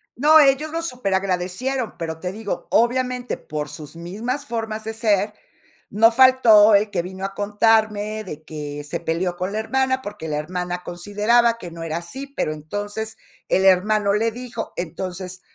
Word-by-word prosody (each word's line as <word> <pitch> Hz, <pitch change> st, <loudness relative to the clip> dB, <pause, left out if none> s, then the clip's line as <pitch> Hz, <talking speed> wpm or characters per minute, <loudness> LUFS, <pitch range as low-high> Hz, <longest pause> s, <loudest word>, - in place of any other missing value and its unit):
No, 310 Hz, +4 st, +6 dB
ellos 290 Hz, +2 st, +3 dB
lo 330 Hz, 0 st, -2 dB
superagradecieron, 195 Hz, -, -2 dB
pero 160 Hz, -1 st, -5 dB
te 180 Hz, +2 st, -4 dB
digo, 210 Hz, 0 st, -5 dB
obviamente, 250 Hz, +1 st, +1 dB
por 150 Hz, -1 st, -5 dB
sus 150 Hz, +1 st, -10 dB
mismas 220 Hz, +12 st, -4 dB
formas 220 Hz, -2 st, -4 dB
de 220 Hz, +1 st, -4 dB
ser, 210 Hz, -2 st, +1 dB, 0.6 s
no 225 Hz, +3 st, +5 dB
faltó 230 Hz, -4 st, +7 dB
el 205 Hz, +1 st, +2 dB
que 180 Hz, -4 st, 0 dB
vino 190 Hz, +2 st, -6 dB
a 195 Hz, -, -5 dB
contarme 215 Hz, +1 st, +1 dB
de 155 Hz, -5 st, -8 dB
que 145 Hz, -1 st, -6 dB
se 145 Hz, -, -4 dB
peleó 175 Hz, +2 st, -2 dB
con 185 Hz, +3 st, -3 dB
la 215 Hz, -, -1 dB
hermana, 260 Hz, +3 st, 0 dB
porque 205 Hz, -7 st, -7 dB
la 150 Hz, -1 st, -2 dB
hermana 180 Hz, +3 st, -4 dB
consideraba 210 Hz, +6 st, +2 dB
que 175 Hz, -7 st, -9 dB
no 165 Hz, 0 st, -8 dB
era 160 Hz, 0 st, -3 dB
así, 265 Hz, +12 st, -6 dB
pero 270 Hz, -, -2 dB
entonces 205 Hz, +8 st, -5 dB, 0.3 s
el 190 Hz, +1 st, +2 dB
hermano 200 Hz, +2 st, +4 dB
le 225 Hz, +2 st, +1 dB
dijo. 245 Hz, -1 st, -6 dB
Entonces 180 Hz, +2 st, -5 dB
205 Hz, 165 wpm, -22 LUFS, 180-235 Hz, 0.6 s, faltó